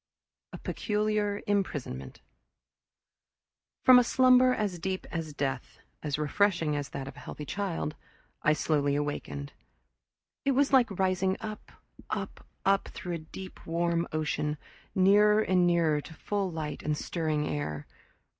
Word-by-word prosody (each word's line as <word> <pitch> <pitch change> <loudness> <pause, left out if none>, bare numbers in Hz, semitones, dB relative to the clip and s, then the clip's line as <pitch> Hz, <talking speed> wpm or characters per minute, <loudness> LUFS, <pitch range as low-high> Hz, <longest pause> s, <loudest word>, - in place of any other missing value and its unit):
A - - -7
Peculiar 210 -1 -1
Imprisonment 145 - -2 1.6
From 255 -1 +9
a - - +4
slumber 255 +1 +5
as 205 -7 -1
deep 185 +2 -3
as 165 -2 -3
death, 135 -3 -3 0.2
as 150 -2 -2
refreshing 160 0 +1
as 145 -1 -3
that 135 - -5
of 135 - -8
a - - -9
healthy 150 - -7
child, 185 -5 -2 0.5
I 155 - +4
slowly 145 -2 +1
awakened. 110 - -3 0.9
It 275 - +2
was 280 +1 +2
like 255 -3 +6
rising 190 0 +1
up, 215 -2 -7 0.4
up, - - -4 0.2
up 195 0 +3
through 180 - -6
a - - -1
deep 190 -1 -9
warm 170 0 0
ocean, 150 -1 -1 0.4
nearer 205 +3 +5
and 185 -4 +3
nearer 165 -4 +3
to 160 - -12
full 200 +1 -2
light 155 -2 -4
and 150 0 -1
stirring 155 -3 -1
air. 75 - -3
170 Hz, 135 wpm, -29 LUFS, 150-205 Hz, 1.6 s, From